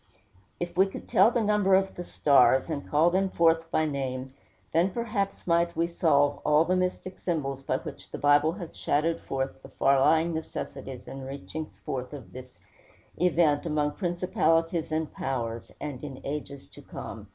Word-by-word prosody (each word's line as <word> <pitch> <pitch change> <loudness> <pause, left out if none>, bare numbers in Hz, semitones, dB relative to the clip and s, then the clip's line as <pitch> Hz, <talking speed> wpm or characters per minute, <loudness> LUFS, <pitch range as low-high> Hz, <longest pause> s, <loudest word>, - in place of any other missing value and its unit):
If 175 0 -4
we 190 +2 +5
could 195 - -9
tell 195 +4 +5
the 240 -1 0
number 205 -2 +3
of 190 0 +1
the 175 - -6
stars, 140 -2 +4
and 145 -2 -4
call 160 +4 +4
them 190 +1 +1
forth 165 -1 +2
by 155 -1 +1
name, 135 -3 -3 0.4
then, 170 +4 +3
perhaps, 210 -2 -3
might 170 0 +2
we 165 - +2
solve 155 -4 +2
all 150 +2 +4
the 180 +2 +1
mystic 185 0 -2
symbols 140 -6 -2
by 130 -1 -1
which - - -9
the - - -6
Bible 145 +2 +4
has 175 -3 -8
shadowed 160 +3 0
forth 135 0 -3
the 135 - -12
far 135 0 +3
lying 160 +4 +3
necessities 135 -5 -6
and 135 - -7
reachings 140 +3 -7
forth 130 +1 -4
of 125 -11 -10
this 130 0 -11 0.6
event 165 -3 +2
"among 150 -1 +1
principalities 165 -2 0
and 155 0 -2
powers," 115 -3 -3
and 145 -3 -6
in 135 -3 -7
"ages 140 -1 -5
to - - -14
come." - - -8
155 Hz, 175 wpm, -28 LUFS, 135-175 Hz, 0.6 s, we